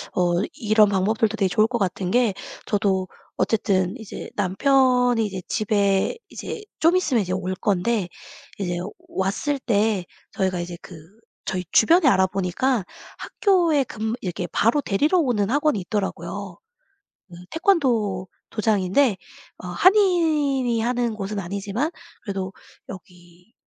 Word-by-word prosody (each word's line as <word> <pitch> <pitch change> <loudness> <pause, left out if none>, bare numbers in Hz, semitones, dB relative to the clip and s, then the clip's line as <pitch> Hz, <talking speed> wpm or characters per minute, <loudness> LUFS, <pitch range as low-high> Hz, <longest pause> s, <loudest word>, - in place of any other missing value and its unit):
어 175 -1 +2 0.2
이런 215 -5 +3
방법들도 210 +3 +1
되게 195 -3 +1
좋을 215 +4 +3
것 245 - -2
같은 185 -1 -1
게 240 -4 +3 0.3
저도 190 -3 0 0.3
어쨌든 190 -4 +1
이제 220 -4 -8
남편이 250 +3 +3
이제 190 -3 -5
집에 200 - +1
이제 445 - -7 0.2
좀 330 +3 +4
있으면 290 -11 +2
이제 185 - -3
올 185 0 -2
건데 200 +1 0 0.5
이제 175 -3 -2 0.3
왔을 200 +10 -1
때 210 -6 +1 0.3
저희가 185 -2 -1
이제 175 0 -6
그 180 - -11 0.5
저희 180 -1 -3
주변에 330 +7 +5
알아보니까 190 +2 +1 0.3
학교에 345 -8 +2
근무 220 -2 -4
이렇게 180 -1 -4
바로 240 +7 +2
데리러 295 - +1
오는 225 -9 +1
학원이 290 -4 +1
있더라고요. 195 -1 -4 0.7
음 - - -10 0.2
태권도 240 - +1 0.2
도장인데 215 +1 +2 0.4
어 180 - -7
한인이 305 - +3
하는 240 -1 0
곳은 210 0 -4
아니지만 200 - -3 0.3
그래도 195 -3 -4 0.3
여기 180 +2 -14
210 Hz, 275 characters per minute, -23 LUFS, 190-255 Hz, 0.7 s, 주변에